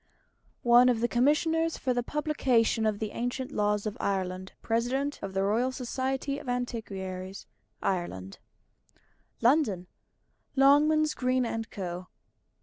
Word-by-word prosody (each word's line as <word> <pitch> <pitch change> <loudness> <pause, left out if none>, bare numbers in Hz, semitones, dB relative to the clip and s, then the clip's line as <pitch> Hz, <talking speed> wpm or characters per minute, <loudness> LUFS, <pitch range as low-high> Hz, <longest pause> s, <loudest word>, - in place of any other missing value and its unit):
_One 240 +1 +7
of 240 -2 +2
the 240 - +2
Commissioners 320 +6 +2
for 255 - 0
the 245 - 0
Publication 250 -6 +1
of 215 -1 0
the 215 0 -4
Ancient 245 +3 -3
Laws 210 0 0
of 215 - -3
Ireland 190 -1 -2
President 255 +5 -1
of 195 -1 -6
the 195 - +2
Royal 230 +6 +1
Society 265 +2 -2
of 255 - -8
Antiquaries, 195 -6 -4 0.4
Ireland_ 100 - -3 1.0
LONDON: 235 - +3 0.7
LONGMANS, 300 +3 +5
GREEN, 255 -3 0
& - - -36
CO. 180 -2 -5
240 Hz, 125 wpm, -29 LUFS, 200-265 Hz, 1.0 s, One